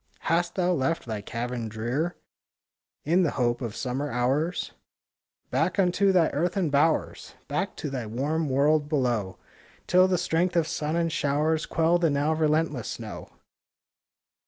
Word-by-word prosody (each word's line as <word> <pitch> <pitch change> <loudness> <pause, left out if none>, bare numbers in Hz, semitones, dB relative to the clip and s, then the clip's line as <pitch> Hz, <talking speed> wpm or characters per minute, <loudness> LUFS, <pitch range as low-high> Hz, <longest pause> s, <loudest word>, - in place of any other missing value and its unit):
Hast 170 +1 0
thou 180 -1 +1
left 165 +1 -1
thy 110 -3 -4
cavern 115 +1 -4
drear, 120 +11 -2 0.9
In 170 +5 +3
the 170 - +2
hope 120 -1 +1
of 115 -3 -4
summer 135 +3 -3
hours? 135 +8 0 0.8
Back 160 +10 +1
unto 195 +1 +3
thy 175 -4 +4
earthen 175 +1 0
bowers! 145 +3 0
Back - - -2
to 145 - -5
thy 125 -5 -4
warm 145 +7 -1
world 145 +3 +2
below, 120 - 0 0.5
Till 185 +1 +5
the 185 -1 +1
strength 175 +1 0
of 165 -2 +2
sun 155 +1 -2
and 170 -1 0
showers 155 +2 0
Quell 165 +2 +2
the 170 -2 +3
now 145 +2 +1
relentless 155 -4 0
snow! - - -7
150 Hz, 145 wpm, -26 LUFS, 130-170 Hz, 0.9 s, Till